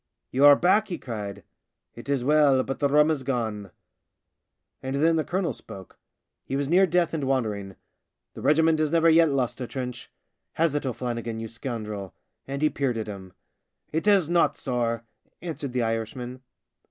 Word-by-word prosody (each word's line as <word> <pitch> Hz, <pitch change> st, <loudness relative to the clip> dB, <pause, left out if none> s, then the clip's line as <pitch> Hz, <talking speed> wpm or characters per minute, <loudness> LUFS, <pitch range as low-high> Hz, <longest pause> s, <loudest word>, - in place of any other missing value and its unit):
" -, -, -57 dB
You 135 Hz, +3 st, +4 dB
are 145 Hz, 0 st, +10 dB
back," 190 Hz, +7 st, +3 dB
he 175 Hz, -, -4 dB
cried. 100 Hz, -, -6 dB, 0.3 s
" -, -, -59 dB
It -, -, -11 dB
is 140 Hz, -3 st, 0 dB
well, 145 Hz, -2 st, +4 dB
but 135 Hz, -, -5 dB
the 145 Hz, -, +3 dB
rum 150 Hz, +2 st, +4 dB
is 150 Hz, -4 st, -1 dB
gone." 110 Hz, -6 st, -3 dB, 1.1 s
And 130 Hz, +1 st, -3 dB
then 160 Hz, +4 st, +3 dB
the 160 Hz, -, +1 dB
colonel 180 Hz, +1 st, -1 dB
spoke. 95 Hz, -2 st, -12 dB, 0.4 s
He 135 Hz, -, -4 dB
was 140 Hz, 0 st, -1 dB
near 185 Hz, +5 st, +4 dB
death 175 Hz, -1 st, +1 dB
and 150 Hz, -4 st, -2 dB
wandering. 105 Hz, -7 st, -2 dB, 0.3 s
" -, -, -59 dB
The -, -, -9 dB
regiment 160 Hz, +1 st, +3 dB
has 155 Hz, -1 st, +1 dB
never 165 Hz, +1 st, +4 dB
yet 165 Hz, 0 st, +5 dB
lost 130 Hz, -2 st, -1 dB
a 125 Hz, -, -3 dB
trench. 125 Hz, -2 st, -6 dB, 0.4 s
Has 165 Hz, -2 st, +1 dB
it, 145 Hz, -2 st, -2 dB
O'Flannigan, 120 Hz, -2 st, -4 dB
you 115 Hz, -, -5 dB
scoundrel? 110 Hz, -5 st, -6 dB
" -, -, -50 dB
And 140 Hz, +2 st, -4 dB
he 155 Hz, -, +5 dB
peered 130 Hz, -4 st, -1 dB
at 110 Hz, -, -3 dB
him. 95 Hz, -3 st, -9 dB, 0.3 s
" -, -, -48 dB
It 160 Hz, +6 st, -1 dB
has 195 Hz, -6 st, +5 dB
not, 170 Hz, 0 st, +2 dB
sorr," 120 Hz, -3 st, -2 dB, 0.4 s
answered 155 Hz, -5 st, -5 dB
the 125 Hz, -1 st, 0 dB
Irishman. 115 Hz, +3 st, -4 dB
135 Hz, 190 wpm, -26 LUFS, 115-155 Hz, 1.1 s, are